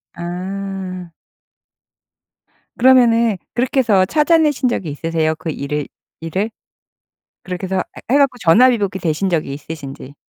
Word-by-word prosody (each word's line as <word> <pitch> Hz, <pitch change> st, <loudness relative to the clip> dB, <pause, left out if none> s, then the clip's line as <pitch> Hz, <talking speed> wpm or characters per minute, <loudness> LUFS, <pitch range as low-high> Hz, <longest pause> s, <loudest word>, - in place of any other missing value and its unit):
아. 185 Hz, 0 st, -5 dB, 1.7 s
그러면은 235 Hz, -4 st, +4 dB, 0.2 s
그렇게 250 Hz, +3 st, 0 dB
해서 205 Hz, -7 st, +4 dB
찾아 305 Hz, -, +3 dB
내신 295 Hz, -5 st, +2 dB
적이 195 Hz, -8 st, -3 dB
있으세요? 160 Hz, +1 st, -1 dB
그 160 Hz, +1 st, -6 dB
일을 145 Hz, 0 st, -3 dB, 0.3 s
일을? 185 Hz, +7 st, -2 dB, 0.9 s
그렇게 180 Hz, 0 st, -5 dB
해서 190 Hz, 0 st, 0 dB, 0.3 s
해 270 Hz, -, +4 dB
갖고 275 Hz, -3 st, +3 dB
전화위복이 205 Hz, +1 st, +4 dB
되신 170 Hz, +2 st, -1 dB
적이 155 Hz, -5 st, -1 dB
있으신지? 140 Hz, -2 st, -9 dB
190 Hz, 270 characters per minute, -18 LUFS, 165-235 Hz, 1.7 s, 그러면은